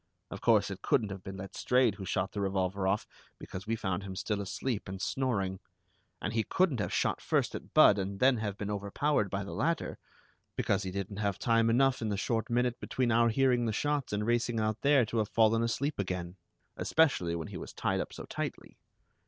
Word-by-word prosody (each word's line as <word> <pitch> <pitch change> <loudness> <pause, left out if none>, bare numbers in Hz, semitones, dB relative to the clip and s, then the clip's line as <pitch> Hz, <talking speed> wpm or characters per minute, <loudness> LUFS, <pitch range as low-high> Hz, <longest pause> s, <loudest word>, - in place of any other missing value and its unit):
Of - - -7
course, - - +3
it - - -7
couldn't 105 -3 +1
have 95 -1 -6
been 95 0 -7
Letstrayed 110 +5 +1
who 95 0 -8
shot 90 +1 -1
the 100 - -3
revolver 95 0 0
off, 100 +3 +1 0.3
because 95 +3 -8
we 115 - +1
found 95 -5 -2
him 95 -1 -7
still 105 +2 -2
asleep 105 +2 -3
and 95 0 -5
snoring; 100 -7 -1 0.6
and 105 - -3
he 115 - +2
couldn't 175 - +1
have 105 - -2
shot - - 0
first - - +1
at - - -8
Budd 100 - +7
and 95 +1 -3
then 130 +1 +5
have 105 -2 -3
been 105 0 -3
overpowered 105 +3 0
by 100 +1 -2
the 100 - -7
latter, 165 +1 -1 0.6
because 100 -1 +1
he 95 - -3
didn't 100 +1 -4
have 100 -3 -1
time 115 -1 +3
enough 135 +2 +3
in 110 - -1
the 100 - -1
short 115 +4 -1
minute 120 +1 +1
between 125 -2 -1
our 115 +1 +4
hearing 125 0 +2
the - - +1
shots 145 +3 -1
and 105 +1 -1
racing 120 0 +1
out 110 0 -1
there 140 -3 +4
to 115 +1 -2
have 105 - 0
fallen 115 0 +3
asleep 140 +5 -1
again, 90 -2 -3 0.4
especially 125 - +2
when 80 -2 -5
he - - -6
was - - -7
tied - - -1
up - - -6
so - - -8
tightly. - - -6
105 Hz, 210 wpm, -31 LUFS, 95-120 Hz, 0.6 s, Budd